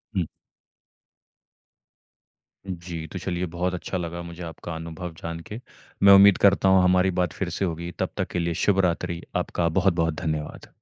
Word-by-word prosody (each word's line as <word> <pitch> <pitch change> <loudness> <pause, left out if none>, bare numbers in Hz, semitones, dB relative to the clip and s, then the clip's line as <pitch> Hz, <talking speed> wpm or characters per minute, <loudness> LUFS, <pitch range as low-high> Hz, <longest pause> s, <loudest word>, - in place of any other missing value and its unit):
हुँ। 90 -3 +1 2.4
जी। 85 -3 -6
तो 95 - -7
चलिए 90 0 -2
बहुत 90 +1 -1
अच्छा 90 +1 -3
लगा 85 0 -4
मुझे 85 +1 -8
आपका 80 0 -7
अनुभव 80 +1 -6
जान 85 0 -5
के। 105 - -6 0.4
मैं 100 0 +9
उम्मीद 100 0 +8
करता 100 -1 +5
हूँ 95 -1 +5
हमारी 90 +1 +4
बात 90 -3 -1
फ़िर - - -3
से 100 - -1
होगी 85 0 -4
तब - - 0
तक - - -1
के 90 - -1
लिए 85 0 -1
शुभ 100 -2 +3
रात्रि। 85 0 -2
आपका 85 -1 0
बहुत-बहुत 85 -4 +2
धन्यवाद। 80 -3 -4
85 Hz, 165 wpm, -25 LUFS, 85-95 Hz, 2.4 s, मैं